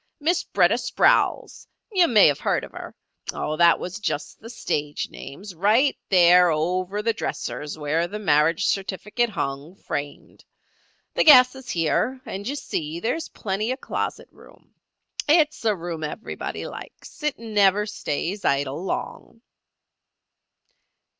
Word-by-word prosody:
Miss 340 +4 +1
B'retta - - +2
Sprowls—you 370 -6 +1
may 215 -4 +6
have 145 - +3
heard - - 0
of - - -9
her—Oh, 155 - -7
that 170 -1 +5
was 185 +4 -6
just 150 -7 -4
the 225 - -10
stage 150 -10 -3
names—right 205 - 0
there 180 -1 +6
over 180 +6 -1
the 230 +1 +1
dresser - - -4
is 150 +1 -6
where 155 +3 0
the 210 - -6
marriage 160 -4 +2
certificate 210 +4 -1
hung, 145 -2 -4
framed. 145 -6 -7 0.7
The - - +2
gas 255 -5 +8
is 265 -2 -12
here, 175 +10 0
and 200 +2 -6
you 280 - -2
see 160 - -4
there 225 +7 0
is 325 - -5
plenty 210 +1 -3
of 260 - -4
closet - - -4
room. - - -20 0.6
It's 305 -4 +3
a 215 -2 +3
room 170 -2 -6
everybody 155 +9 -5
likes. - - -11
It 300 -2 -1
never 210 -2 +2
stays 195 -1 -4
idle 140 +3 0
long." 225 +4 -6
195 Hz, 135 wpm, -24 LUFS, 160-230 Hz, 0.7 s, gas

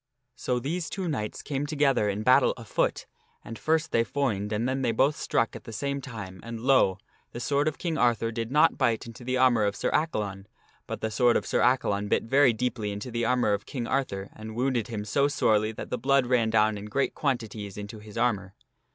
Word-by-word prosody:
So 125 -1 -1
these 160 +7 -3
two 190 -2 -3
knights 105 -10 -3
came 145 0 -2
together 140 -8 +2
in 100 +2 -2
battle 130 +3 +5
afoot, 115 -3 -1 0.4
and 115 - -8
first 160 0 +1
they 115 - +3
foined 110 -7 -1
and 110 +3 0
then 135 +1 -1
they 125 - +1
both 135 +6 +2
struck 115 - 0
at - - -9
the - - -8
same 140 +5 -3
time 105 -8 -8
and, 115 -1 -7
lo! 120 -7 +3 0.4
the - - -5
sword 140 +4 +1
of 155 - -1
King 165 -3 -2
Arthur 115 -2 +2
did 115 0 -3
not 155 +3 +4
bite 115 -1 +1
into 115 +1 -10
the 130 +1 -1
armor 125 -4 +4
of 100 0 0
Sir - - -1
Accalon, 105 -11 -1 0.4
but - - -5
the 110 - -2
sword 120 +1 +4
of - - -3
Sir - - 0
Accalon 105 -5 +2
bit - - +2
very 135 +2 +4
deeply 115 -2 -2
into 105 +5 -6
the 115 0 -1
armor 120 -3 +2
of 100 0 -3
King 125 -4 -4
Arthur 105 -8 -2
and 110 0 -8
wounded 125 -2 0
him 110 -3 -5
so 140 +7 +2
sorely 110 -6 +2
that - - -8
the 125 - -1
blood 135 +1 +3
ran 120 -3 +2
down 110 -1 +2
in 100 - -8
great 135 +6 -1
quantities 110 -8 -3
into 105 +2 -7
his 105 +1 -11
armor. 100 -5 0
115 Hz, 220 wpm, -27 LUFS, 105-135 Hz, 0.4 s, battle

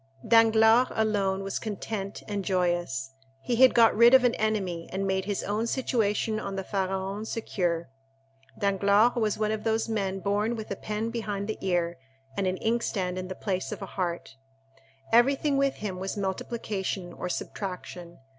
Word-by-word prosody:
Danglars 225 +1 +6
alone 200 -3 +1
was 195 0 -3
content 205 -2 -5
and 205 -2 -3
joyous—he 135 - -2
had 260 +1 +6
got 230 -1 +6
rid 235 +3 +7
of 260 - +6
an 245 -1 +3
enemy 195 -6 -2
and 195 +1 -2
made 190 0 0
his 205 -1 -2
own 215 +3 -1
situation 220 -4 0
on 195 - -5
the 195 - -3
Pharaon 195 +1 -2
secure. 175 -7 -2 0.7
Danglars 200 +3 +3
was 220 -3 0
one 215 0 0
of 220 -1 -3
those 225 0 0
men 195 -4 -1
born 205 +5 0
with 220 -2 -7
a - - -1
pen 215 +3 -3
behind 205 -4 -3
the 215 - -4
ear, 175 -4 0 0.4
and 195 - 0
an 185 0 -1
inkstand 195 -5 -1
in 185 - -5
place 185 0 -3
of - - -5
a 190 - -9
heart. 175 -7 -3 0.7
Everything 275 +5 +4
with 275 0 +2
him 195 -4 -5
was 195 +2 -4
multiplication 190 -2 -3
or 180 - -5
subtraction. 180 -2 -6
200 Hz, 160 wpm, -27 LUFS, 185-220 Hz, 0.7 s, rid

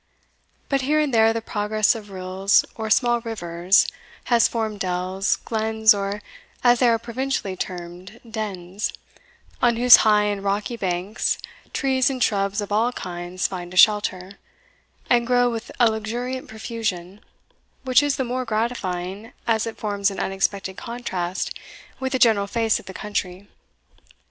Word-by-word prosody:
But 275 -1 +1
here 300 +4 +2
and 295 -4 0
there 225 -1 +5
the 225 0 -3
progress 210 0 +1
of 215 -3 -9
rills, 190 +1 +1
or 220 -1 -5
small 240 +1 +3
rivers, 180 -5 +2 0.4
has 235 -2 +4
formed 220 -3 -3
dells, 185 +1 0
glens, 220 -1 +2
or 200 +1 -3 0.4
as 245 -1 +5
they 250 - +5
are 230 - +3
provincially 235 -3 -3
termed, 180 +4 -7
dens, 205 -4 -4 0.7
on 240 -1 +4
whose 245 +1 +9
high 210 -1 +4
and 205 -1 -2
rocky 205 +4 -1
banks 190 0 -1 0.3
trees 265 -2 +1
and 255 -3 -1
shrubs 200 0 0
of 205 - -6
all 225 +4 +2
kinds 175 -1 -5
find 180 -1 -7
a - - -5
shelter, 200 -2 +3 0.7
and 240 -1 +3
grow 245 -1 +3
with 230 0 -5
a 235 -2 +5
luxuriant 240 +4 -4
profusion, 215 -4 -5 0.6
which 255 0 +4
is 290 -1 +1
the 265 - -1
more 255 +1 -2
gratifying, 215 -2 -3
as 225 0 +1
it 225 - -6
forms 205 -1 0
an 195 - -6
unexpected 195 0 -2
contrast 190 -7 -4 0.5
with 265 0 -3
the - - +2
general 220 -5 +4
face 225 +1 +1
of - - -16
the 190 - -7
country. 200 -2 -4
215 Hz, 150 wpm, -23 LUFS, 190-235 Hz, 0.7 s, whose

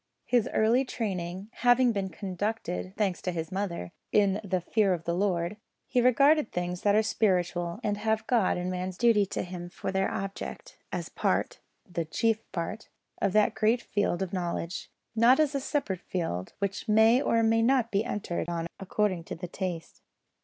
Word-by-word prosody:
His 245 -3 +2
early 230 +4 +3
training 190 -5 -4
having 245 0 +4
been 195 -3 -2
conducted 185 - -3
(thanks 195 -4 0
to 180 - -2
his 165 0 -4
mother) 185 - -3 0.2
"in 200 0 +3
the 185 -2 0
fear 195 +1 +2
of 165 - -9
the 170 - -1
Lord," 180 0 0 0.3
he 250 - +1
regarded 275 +3 +4
things 180 0 -3
that 205 0 +3
are 215 - +4
spiritual, 180 -5 0
and 205 -2 0
have 220 +1 0
God 225 -8 +2
and 180 +1 -2
man's 185 0 -4
duty 225 -4 +4
to - - -3
Him 175 -1 -7
for 190 - -4
their 190 0 +1
object, 195 0 -5 0.2
as - - -3
part - - 0 0.3
the 170 -2 -2
chief 225 +7 0
part 180 +6 -4 0.3
of 200 - +2
that 215 -1 +4
great 220 +2 +2
field 205 -3 0
of 190 - -6
knowledge; 175 -1 -3 0.3
not 235 +4 +6
as 300 -2 +3
a 280 - 0
separate 260 - -2
field 95 - -3
which 200 +2 -3
may 220 +4 +6
or 230 -4 +2
may 225 0 +3
not 245 -1 +3
be 200 +1 +2
entered 200 -7 -3
on 170 -1 -2
according 195 -2 0
to - - -5
taste. 180 -1 -5
200 Hz, 175 wpm, -28 LUFS, 180-225 Hz, 0.3 s, not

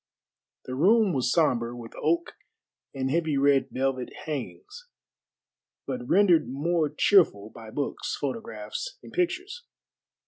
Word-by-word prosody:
The 130 - -6
room 195 - +4
was 125 -3 0
sombre 120 -7 +1
with 115 -1 -10
oak 340 +1 0 0.6
and 135 -1 -2
heavy 160 -2 +1
red 140 -1 +3
velvet 130 -1 -2 0.2
hangings, 405 - -6 1.0
but 250 -1 -5
rendered 180 -5 +4
more 155 +3 0
cheerful 145 - +3
by 115 -1 -11
books, 140 +5 -3
photographs, 470 - -5
and - - -13
pictures. 370 +6 -2
155 Hz, 115 wpm, -27 LUFS, -, 1.0 s, room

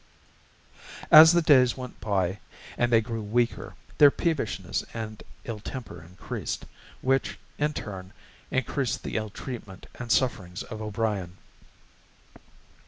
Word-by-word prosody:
As 160 +1 +11
the 175 -1 +3
days 130 -6 +5
went 125 -1 -8
by 95 -2 0 0.4
and 120 0 +1
they 115 -1 +5
grew 115 0 -4
weaker, 115 +2 -1 0.2
their 145 - +10
peevishness 150 - -2
and 110 -2 -6 0.2
ill 115 -3 -5
temper 105 -7 -7
increased, 90 +3 -6 0.4
which, 135 +1 +1 0.2
in 150 +1 +1
turn, 95 -7 -7 0.4
increased 130 0 -1
the - - -5
ill 110 -1 -1
treatment 105 -5 -8
and 120 -1 -6
sufferings 95 -9 0
of 110 -1 -8
O'Brien. 105 -4 -2
115 Hz, 120 wpm, -27 LUFS, 100-130 Hz, 0.4 s, As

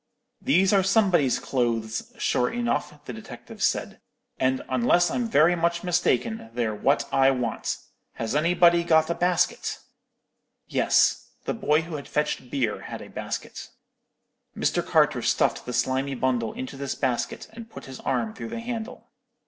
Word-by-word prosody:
"'These 195 -7 +3
are 195 - +5
somebody's 190 - +3
clothes, 115 -3 -2
sure 125 - +1
enough,' 235 -11 -2
the 125 - -6
detective 110 -1 -10
said; - - 0 0.4
'and, 130 0 +1
unless 130 +8 +3
I'm 245 -2 -1
very 165 0 +5
much 170 0 0
mistaken, 180 - 0
they're 115 -3 0
what 135 +7 +1
I 135 0 +5
want. 125 -4 -1 0.4
Has 115 +3 -3
anybody 170 +2 +4
got 160 -1 +3
a - - +2
basket?' 175 +1 0 0.9
"Yes. - - +2 0.2
The - - -1
boy 165 -9 +2
who 160 -2 -5
had 140 - -9
fetched 150 -4 -2
beer 120 -6 -1
had - - -7
a - - -12
basket. - - -6 0.9
Mr. - - +1
Carter - - +3
stuffed - - +1
the - - -3
slimy 135 +2 0
bundle 120 -3 0
into 130 +1 -6
this 140 -1 -3
basket, 125 -3 -2
and 225 0 -10
put - - -10
his 130 -1 -9
arm 220 -1 -1
through 225 - -7
the 230 0 -5
handle. 230 -1 -6
150 Hz, 155 wpm, -25 LUFS, 130-180 Hz, 0.9 s, are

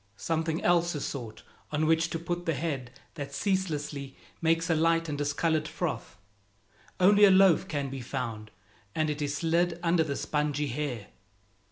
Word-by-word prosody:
Something 160 +3 -1
else 175 -1 +3
is 145 - -3
sought 120 -6 -6 0.3
on 150 +1 +1
which 165 +1 +3
to 165 - -2
put 175 +1 -4
the 165 - +1
head 135 -4 -3 0.2
that 140 -2 -6
ceaselessly 150 -7 -2 0.2
makes 165 0 +2
a 170 - +3
light 165 +1 +2
and 150 - -2
discolored 150 +2 0
froth. - - -4 0.8
Only 205 +3 +6
a 205 - +9
loaf 190 -1 +5
can 140 -5 -3
be 135 -1 -5
found, 110 -3 -4 0.5
and 155 -1 +1
it 150 0 -5
is 145 0 -1
slid 170 +2 +1
under 170 -1 +3
the 140 -3 -3
spongy 150 -1 -1
hair. 125 -5 -4
155 Hz, 165 wpm, -29 LUFS, 145-165 Hz, 0.8 s, a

